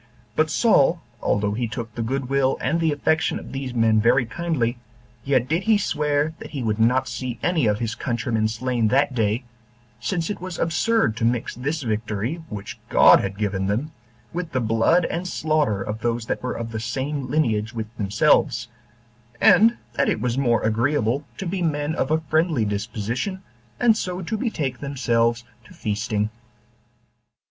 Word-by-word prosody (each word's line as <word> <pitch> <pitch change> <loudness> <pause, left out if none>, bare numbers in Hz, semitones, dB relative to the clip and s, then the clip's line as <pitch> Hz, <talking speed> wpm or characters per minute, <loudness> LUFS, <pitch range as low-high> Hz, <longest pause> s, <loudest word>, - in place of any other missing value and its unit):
But 155 0 +2
Saul, 170 - +4 0.2
although 105 0 +1
he 120 +2 -1
took 115 +1 -6
the 115 - -4
good 130 +3 -2
will 135 0 +2
and 155 +6 0
the 165 -2 +2
affection 160 +2 +1
of - - -9
these 135 -1 -4
men 115 -2 +3
very 120 +3 +4
kindly, 125 -4 -1 0.4
yet 130 -2 +1
did 165 +5 +1
he 220 -1 +5
swear 150 -4 0
that - - -8
he 140 -5 -4
would 110 -1 -1
not 125 +4 +3
see 125 -2 -4
any 165 -9 +2
of 105 -1 +2
his 115 0 -2
countrymen 115 -3 -1
slain 115 +1 0
that 140 +4 +2
day, 110 0 0 0.6
since 165 +8 -2
it 205 - -6
was 185 -1 -5
absurd 170 - +1
to 115 - -3
mix 120 +1 0
this 145 +5 -3
victory, 110 - -2
which 100 -1 -7
God - - +7
had 100 0 -3
given 100 -2 -1
them, 120 +10 -1 0.4
with 170 -1 -4
the 130 - +1
blood 115 +10 +3
and 175 +2 -3
slaughter 150 - 0
of 105 +1 -4
those 115 0 -1
that - - -2
were 125 - -3
of 115 -1 -5
the 110 - -3
same 130 +4 -3
lineage 110 -7 0
with 110 0 -6
themselves; 120 +3 +2 0.7
and 230 +3 +6 0.2
that - - +1
it - - 0
was 125 -1 -1
more 120 -4 +2
agreeable 120 +4 +1
to 195 - -5
be 185 +1 -2
men 150 -2 0
of 135 - -1
a 160 +1 +2
friendly 155 -5 +1
disposition, 110 - -3 0.4
and 235 -2 +5
so 185 -3 -3
to 220 +6 -2
betake 155 - -2
themselves 120 -4 0 0.2
to 115 - -16
feasting. 105 0 -1
125 Hz, 175 wpm, -23 LUFS, 110-155 Hz, 0.7 s, God